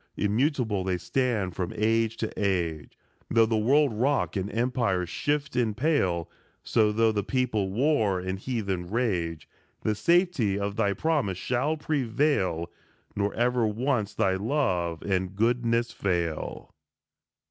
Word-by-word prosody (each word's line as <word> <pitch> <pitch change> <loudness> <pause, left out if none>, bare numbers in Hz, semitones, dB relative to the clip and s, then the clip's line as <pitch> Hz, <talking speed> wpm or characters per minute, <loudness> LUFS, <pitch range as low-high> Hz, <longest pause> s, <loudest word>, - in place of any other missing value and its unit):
Immutable 110 -2 +1
they 90 -1 0
stand 110 -5 -1
from 90 -2 -3
age 115 +1 +1
to 110 - -3
age 85 -8 -2 0.3
Though 115 0 +5
the 110 0 0
world 135 +5 +3
rock 130 +5 0
and 100 +1 -2
empires 115 -7 0
shift 145 +7 -1
and 115 -4 0
pale; 95 - +1 0.4
So, 110 -2 +2
though 110 +1 +3
the 105 -1 0
people 110 -6 0
war 110 -5 +2
and 95 +1 -4
heathen 100 -7 -3
rage, 90 -8 -1 0.4
The 110 - +1
safety 140 - +2
of 100 0 -2
thy 100 -2 +1
promise 135 - 0
shall 130 +9 0
prevail, 130 - 0 0.4
Nor 100 0 0
ever 120 -1 +2
once 110 -1 -1
thy 95 - +2
love 95 - -1
and 95 -1 -1
goodness 115 +1 +1
fail. 85 -5 -3
110 Hz, 135 wpm, -27 LUFS, 95-125 Hz, 0.4 s, Though